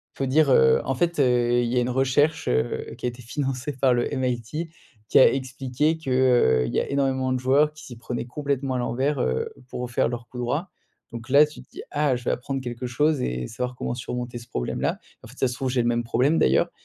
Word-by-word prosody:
Il - - -23
faut - - +1
dire, 145 +3 +3
heu: 65 - +5
«En 135 - -1
fait, 170 +3 0
heu, 120 -2 +3
il 120 -1 -1
y 125 - 0
a - - +4
une 120 - -1
recherche, 145 +5 +1
heu, 65 +1 -1
qui - - -6
a - - +2
été 120 +1 -11
financée 135 +2 -3
par 130 -1 +2
le 120 0 0
MIT, 130 +6 -3 0.4
qui - - +6
a - - +7
expliqué 135 +3 -1
que, 160 - -6
heu, 125 - +3
il - - -4
y - - +2
a - - -3
énormément 135 -2 0
de 130 - 0
joueurs 140 +4 +3
qui 155 0 -13
s'y 120 - -9
prenaient 120 +1 -4
complètement 140 0 -2
à 125 - -1
l'envers, 130 +4 -1
heu, 65 0 0 0.2
pour 125 0 -5
faire 120 - +1
leur 120 0 -6
coup 125 - -9
droit». 145 +10 -2 0.4
Donc 120 +1 -8
là, 140 +3 +7
tu 150 - -12
te - - -20
dis: - - -9
«Ah, 145 -3 +1
je 125 - -6
vais - - 0
apprendre 135 +2 -3
quelque 120 0 -5
chose 145 +3 +1
et 60 - -2
savoir 125 - -4
comment 120 - -3
surmonter 120 0 -5
ce 120 - -14
problème-là. - - -2 0.3
En - - -11
fait, 115 - -14
si - - -17
ça 130 - +4
se 125 - -4
trouve 130 +1 -3
j'ai 125 -1 +1
le - - 0
même 120 0 +1
problème, 125 +7 +2
d'ailleurs» 65 - +3
125 Hz, 255 wpm, -24 LUFS, 120-140 Hz, 0.4 s, a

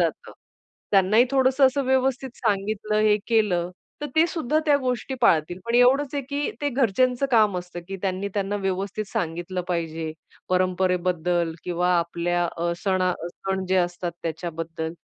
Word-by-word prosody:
जातं. - - -2 0.6
त्यांनाही 205 +4 +5
थोडंसं 265 0 +4
असं 275 +2 0
व्यवस्थित 265 0 +1
सांगितलं, 210 +1 -1
हे 215 -1 +4
केलं, 195 -6 +2 0.3
तर 295 - -2
ते 320 +1 +6
सुद्धा 310 -3 0
त्या 290 -1 +5
गोष्टी 255 0 -2
पाळतील. 175 -5 +3
पण 235 - -1
एवढंच 265 +3 +4
आहे, 285 - -1
की 285 +2 -2
ते 290 - 0
घरच्यांचं 255 +1 +2
काम 215 -5 +4
असतं 180 0 -8
की 195 - -4
त्यांनी 190 +1 -1
त्यांना 200 0 -1
व्यवस्थित 195 +2 -2
सांगितलं 175 +2 -2
पाहिजे 165 -2 -2 0.4
परंपरेबद्दल 180 -2 +1
किंवा 180 0 0
आपल्या 170 +1 -1
अ, 170 +1 -1
सणा 185 -2 +2 0.2
सण 190 +2 -4
जे 190 - +2
असतात 175 -1 -1
त्याच्याबद्दल. 165 -1 -4
195 Hz, 145 wpm, -24 LUFS, 175-250 Hz, 0.6 s, ते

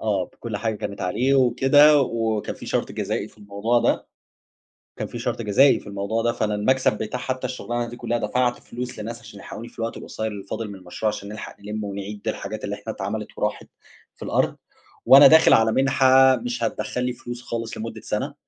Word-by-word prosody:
آه 100 -4 0
بكلّ 115 -3 -6
حاجة 110 +1 -2
كانت 100 0 -6
عليه، 120 +9 +1
وكده 135 +4 +5
وكان 115 -4 -1
في - - -11
شرط - - -1
جزائي - - -3
في - - -24
الموضوع 105 +4 0
ده، - - +1 0.9
كان - - -3
في 120 - -7
شرط 120 0 -2
جزائي 115 +6 +4
في - - -15
الموضوع 100 +3 -2
ده، 120 - +2
فأنا 105 -2 -1
المكسب 130 +1 +2
بتاع 110 +3 -4
حتّى 130 0 -3
الشغلانة 120 -1 -3
دي 120 - -8
كلّها 120 0 -1
دفعت 125 +1 0
فلوس 125 0 -7
لناس 115 +2 -6
عشان 110 -3 -13
يلحقوني 115 +4 -8
في - - -18
الوقت 115 0 -3
القصير 110 - -5
اللي 105 -2 -6
فاضل 110 +3 -5
من 100 - -8
المشروع، 90 +3 -5
عشان 100 -1 -7
نلحق 105 +1 -8
نلمّه 105 +1 -5
ونعيد 100 +2 -7
الحاجات 110 0 -4
اللي 100 0 -3
إحنا 110 +2 -6
اتعملت 105 +2 -4
وراحت - - -2 0.5
في - - -9
الأرض، - - +1 0.5
وأنا 140 +1 +10
داخل 160 +3 +7
على 110 0 +4
مِنحة 130 0 +5
مش 120 0 -4
هتدخّل 115 +2 -2
لي 125 0 -1
فلوس 120 0 -8
خالص 115 -2 -5
لمدّة 115 +1 -6
سنة، - - -3
115 Hz, 200 wpm, -23 LUFS, 105-125 Hz, 0.9 s, وأنا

